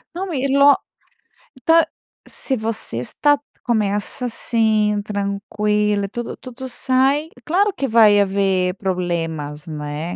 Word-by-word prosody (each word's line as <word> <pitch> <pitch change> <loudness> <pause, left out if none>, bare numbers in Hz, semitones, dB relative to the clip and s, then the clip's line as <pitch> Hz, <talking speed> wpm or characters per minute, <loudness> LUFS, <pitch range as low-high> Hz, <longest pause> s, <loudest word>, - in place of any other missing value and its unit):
Não, 370 0 -4
e 275 -1 0
lo 280 +1 +6 0.9
ta 330 0 +5 0.4
se 265 - -2
você 220 - -3
está 290 - +1 0.2
começa 215 +1 0
assim, 220 -3 +1
tranquila, 210 0 -1
tudo 240 +2 -5
tudo 260 0 -9
sai 265 +5 +1 0.2
claro 395 +6 +2
que 280 -8 -2
vai 220 -4 +6
haver 190 -2 +1
problemas, 165 -6 -3
né? 150 +2 -5
210 Hz, 110 wpm, -20 LUFS, 195-260 Hz, 0.9 s, lo